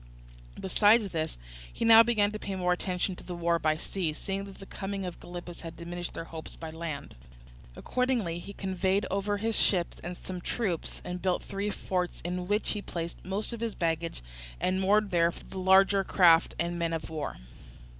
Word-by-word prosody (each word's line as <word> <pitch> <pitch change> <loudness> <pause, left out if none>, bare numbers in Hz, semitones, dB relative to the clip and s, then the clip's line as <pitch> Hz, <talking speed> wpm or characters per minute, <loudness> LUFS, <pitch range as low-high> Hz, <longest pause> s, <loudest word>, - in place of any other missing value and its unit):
Besides 205 +3 +4
this, 160 - -2 0.3
he - - -2
now 225 0 +10
began 215 -3 +3
to 215 - -5
pay 195 -2 -4
more 180 -1 +2
attention 180 +1 -1
to - - -10
the 180 - -6
war 170 0 +1
by 155 -1 +2
sea, 165 0 -2
seeing 195 +5 -3
that 195 -1 -11
the 195 - -10
coming 195 0 -4
of 180 - -6
Gylippus 175 0 -8
had 165 -1 -8
diminished 175 +1 -5
their - - -4
hopes 165 -1 -7
by 160 -1 -7
land. 160 -3 -5 0.6
Accordingly, 245 -10 0
he 195 - -8
conveyed 190 0 0
over 200 +1 0
his 225 +2 0
ships 175 -4 +2
and 175 0 -5
some 180 -1 -6
troops, 185 -5 -2
and 180 0 -4
built 185 0 +1
three 200 +1 -3
forts 180 -3 -2
in 180 +1 -3
which 205 +2 +1
he 210 - -2
placed 170 -3 -5
most 200 +5 -2
of 235 - -5
his 230 -2 -2
baggage, 165 - -1 0.4
and 185 +1 +1
moored 205 +1 +3
there 170 -1 +4
for - - -13
the - - -15
future - - -16
the 190 - -4
larger 195 +1 +5
craft 170 -4 +5
and 170 0 -1
men 165 -1 0
of 165 - -3
war. 155 -2 -4
185 Hz, 200 wpm, -29 LUFS, 170-200 Hz, 0.6 s, now